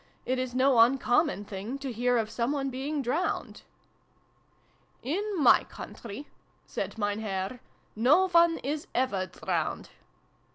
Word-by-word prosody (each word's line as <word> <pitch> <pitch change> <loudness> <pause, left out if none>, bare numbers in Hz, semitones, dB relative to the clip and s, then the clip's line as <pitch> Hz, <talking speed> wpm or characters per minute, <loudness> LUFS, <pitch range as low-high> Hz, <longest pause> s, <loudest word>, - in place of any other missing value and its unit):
It 255 +1 0
is 255 -1 -3
no 260 -1 +4
uncommon 245 0 +3
thing 205 +7 -5
to 275 -2 -5
hear 245 +2 +1
of 220 -1 -1
some 235 +4 -1
one 275 -2 -2
being 275 +3 -3
drowned" 305 +10 -2 1.4
"In 325 +11 -1 0.2
my 290 - +6
country," 235 +6 -9 0.4
said - - -5
Mein 205 -1 -1
Herr, 195 +2 -3 0.4
"no 290 - +4
one 335 -1 +5
is 295 +3 -3
ever 205 -7 0
drowned." 180 - -3
255 Hz, 130 wpm, -28 LUFS, 225-280 Hz, 1.4 s, my